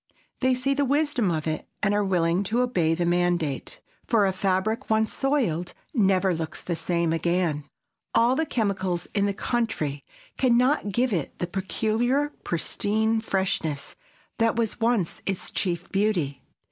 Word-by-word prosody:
They 260 -1 +3
see 265 +2 +1
the 285 +1 +1
wisdom 280 -5 +1
of 155 -3 -1
it 155 -1 -3 0.2
and 200 -1 +3
are 205 0 +2
willing 175 -2 +2
to 235 +5 +1
obey 175 -10 +1
the 175 +1 0
mandate. 175 -5 0 0.3
For 220 -4 +4
a 190 - +1
fabric 195 +6 0
once 220 0 +2
soiled 225 - 0 0.2
never 190 - +3
looks 160 -1 -4
the 175 - -2
same 170 -1 0
again. 165 -3 0 0.5
All 240 +3 +4
the 320 +2 0
chemicals 190 - -1
in 200 -1 +2
the 200 - 0
country 200 - -1 0.4
can 245 -3 +4
not 250 -4 +2
give 245 +3 +1
it 165 -7 -2
the - - -1
peculiar 225 +9 0
pristine 220 +6 0
freshness 180 -8 -1 0.4
that 230 -1 +3
was 230 0 -1
once 225 -6 0
its 195 -2 -2
chief 175 -2 -2
beauty. 190 -9 0
195 Hz, 155 wpm, -26 LUFS, 175-235 Hz, 0.5 s, For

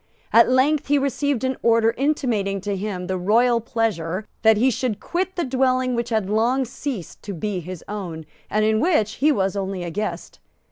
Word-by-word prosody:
At 230 - +7
length 275 +4 +2
he 290 +1 +3
received 280 -1 0
an 260 0 -1
order 230 -1 +3
intimating 235 -9 0
to 200 +1 -2
him 190 -2 -4
the 185 0 -2
royal 230 +5 +3
pleasure 210 -5 -2 0.2
that 220 -1 +5
he 255 +4 +3
should 235 -4 -2
quit 370 +7 -2
the 345 - -1
dwelling 255 -1 +1
which 235 0 -2
had 220 -4 0
long 235 +6 +1
ceased 245 - -6
to 200 -2 -6
be 200 +2 -3
his 180 0 -8
own, 180 -6 -6 0.2
and 215 0 +1
in 220 0 +2
which 225 - +1
he 305 +2 +5
was 195 -7 0
only 195 -2 -3
a 170 - -5
guest. 210 +5 -4
225 Hz, 190 wpm, -22 LUFS, 195-260 Hz, 0.2 s, At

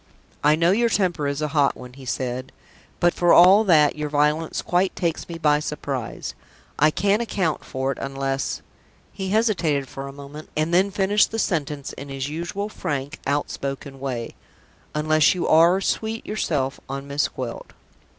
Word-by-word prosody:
"I 150 +1 +5
know 170 +2 +3
your 235 +4 +3
temper 175 -8 +1
is 140 +2 -2
a 150 - -1
hot 145 -3 +2
one," 125 0 -10
he 135 0 -12
said. 130 +1 -3 0.5
"But 175 0 +3
for 175 -1 +3
all 190 +5 +8
that, 155 -6 +5
your 150 0 -3
violence 150 +2 +1
quite 180 +2 +1
takes 170 -1 -2
me 170 - -5
by 150 -2 +3
surprise. 140 -5 -4 0.5
I 155 - +6
can't 200 +7 +1
account 185 -8 -1
for 130 0 -2
it, - - -6
unless" 135 0 -2 0.5
he 190 -1 -4
hesitated 175 - +1
a 135 0 -5
moment, 140 +2 -10
and 155 +2 0
then 190 +3 +4
finished 200 +1 +2
the 225 - -4
sentence 150 -9 -2
in 140 +1 -9
his 135 0 -4
usual 170 +6 -4
frank, 145 -7 -4
outspoken 140 -1 -3
way 125 -4 -4 0.6
"unless 155 +2 +3
you 180 - -1
are 170 +4 +5
sweet 220 +3 -2
yourself 145 -10 -1
on 135 +1 -5
Miss 140 +1 +1
Gwilt." 125 -3 -7
150 Hz, 165 wpm, -23 LUFS, 140-180 Hz, 0.6 s, all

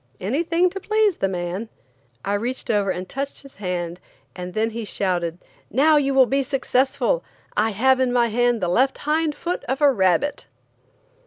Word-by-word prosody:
Anything 335 - +1
to 390 - -5
please 430 -2 +2
the 195 - +1
man. 185 +4 -4 0.6
I 200 - 0
reached 235 +6 -2
over 205 -2 +1
and 185 0 -3
touched 275 +5 -5
his 275 - -15
hand, 180 -3 -3 0.4
and 180 0 -7
then 220 +1 +1
he 230 +1 -5
shouted: 175 -5 -1 0.3
"Now 300 +5 +4
you 275 -2 +1
will 265 -1 +7
be 275 +3 +1
successful. 270 - 0 0.3
I 215 +2 +2
have 260 +5 +3
in 255 -1 +2
my 240 -1 +3
hand 240 0 +1
the 180 - 0
left 260 +10 +2
hind 305 0 +1
foot 350 +1 -3
of 265 +2 -2
a 290 -2 +5
rabbit!" 190 +6 +1
245 Hz, 175 wpm, -22 LUFS, 195-280 Hz, 0.6 s, will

